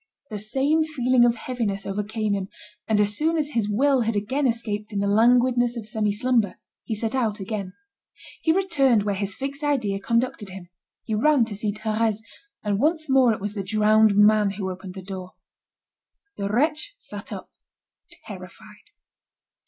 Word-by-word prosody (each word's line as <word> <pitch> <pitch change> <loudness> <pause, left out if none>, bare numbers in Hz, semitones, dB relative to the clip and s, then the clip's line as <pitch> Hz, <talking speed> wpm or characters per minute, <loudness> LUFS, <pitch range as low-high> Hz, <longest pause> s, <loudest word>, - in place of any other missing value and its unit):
The 210 - -4
same 270 +9 +1
feeling 255 -5 +3
of 240 -1 +3
heaviness 225 -5 -3
overcame 210 +1 -2
him, 195 -1 -3 0.4
and 220 -2 +2
as 205 0 +2
soon 320 +5 +1
as 300 -1 -1
his 225 -6 0
will 265 +5 +3
had 225 -1 0
again 260 +8 0
escaped 220 -2 -3
in 205 - -4
the 200 - 0
languidness 240 +3 +3
of 225 - -6
semi 215 -2 0
slumber, 230 -1 +1 0.3
he 220 - -3
set 220 +2 -2
out 225 -5 0
again. 195 -1 -4 0.7
He 320 - +3
returned 285 - +3
where 205 -1 0
his 195 0 -2
fixed 280 +2 -4
idea 240 -10 0
conducted 230 -1 -1
him; 185 -2 -10 0.3
he 220 - -4
ran 255 +3 +4
to 220 -2 -7
see 210 +1 -1
Thérèse, 215 0 -1 0.4
and 205 -2 0
once 315 +3 +1
more 260 -3 +5
it 220 - -2
was 205 +1 -4
the 205 - -3
drowned 215 +1 +4
man 210 0 +5
who 190 -2 -3
opened 185 0 -9
the 190 - -8
door. 185 -1 -7 1.0
The 200 - -3
wretch 300 - 0
sat - - -9
up - - -7 0.7
terrified. 210 - -12
220 Hz, 170 wpm, -24 LUFS, 205-255 Hz, 1.0 s, more